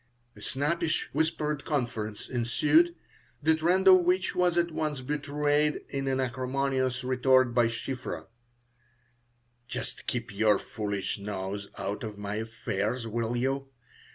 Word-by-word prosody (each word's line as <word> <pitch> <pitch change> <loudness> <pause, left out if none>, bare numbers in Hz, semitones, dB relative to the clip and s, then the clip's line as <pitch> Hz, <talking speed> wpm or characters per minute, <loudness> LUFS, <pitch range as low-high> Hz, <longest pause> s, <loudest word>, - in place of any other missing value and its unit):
A - - -14
snappish 160 +4 -1
whispered 150 -2 0
conference 115 -7 -2
ensued, 150 +8 +3 0.5
the 160 +2 +5
trend 175 +4 +2
of 185 -1 +10
which 180 +1 +1
was 180 -1 +2
at 170 0 +2
once 155 -3 -2
betrayed 145 +2 0
in 135 0 -2
an 135 0 +1
acrimonious 130 0 0
retort 130 -1 +3
by 120 -1 +4
Shiphrah: 125 +2 -4 1.4
"Just - - -6
keep 120 -2 -3
your 105 0 +4
foolish 105 -1 -3
nose 100 0 -4
out 100 +3 -3
of 105 -2 -5
my 105 0 -4
affairs, 110 +1 -2
will 115 +1 -1
you? 135 +2 -1
130 Hz, 125 wpm, -29 LUFS, 115-150 Hz, 1.4 s, of